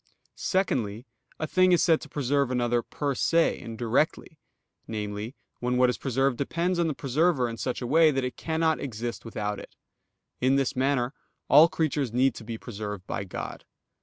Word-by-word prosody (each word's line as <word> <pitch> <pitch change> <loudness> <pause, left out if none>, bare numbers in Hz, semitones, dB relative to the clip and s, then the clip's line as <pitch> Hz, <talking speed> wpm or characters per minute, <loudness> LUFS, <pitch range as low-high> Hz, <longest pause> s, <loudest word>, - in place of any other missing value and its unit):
Secondly, 120 - -1 0.3
a 155 - -1
thing 185 +3 +3
is 175 - +4
said 165 -3 +4
to - - -10
preserve 140 -1 0
another 120 -1 +1
per 145 +3 -3
se 165 +5 +2
and 115 -1 -7
directly, 130 +7 0 0.5
namely, 105 +2 -4 0.2
when 125 0 0
what 125 0 +5
is - - -7
preserved 135 -1 0
depends 170 +5 0
on 170 - +2
the 155 - -2
preserver 145 -1 +1
in 115 - -5
such 125 +2 -3
a - - -2
way 160 +5 +5
that 135 -3 0
it 125 - -4
cannot 160 -1 0
exist 120 -2 -5
without 105 -2 -3
it. - - -12 0.6
In 130 +2 +3
this 135 -2 +1
manner 130 -1 +1 0.4
all 150 +4 +8
creatures 150 -7 -1
need 130 +2 +3
to 115 - -10
be 115 0 -5
preserved 105 -4 -6
by 100 - -4
God. 90 - -6
130 Hz, 180 wpm, -27 LUFS, 115-155 Hz, 0.6 s, all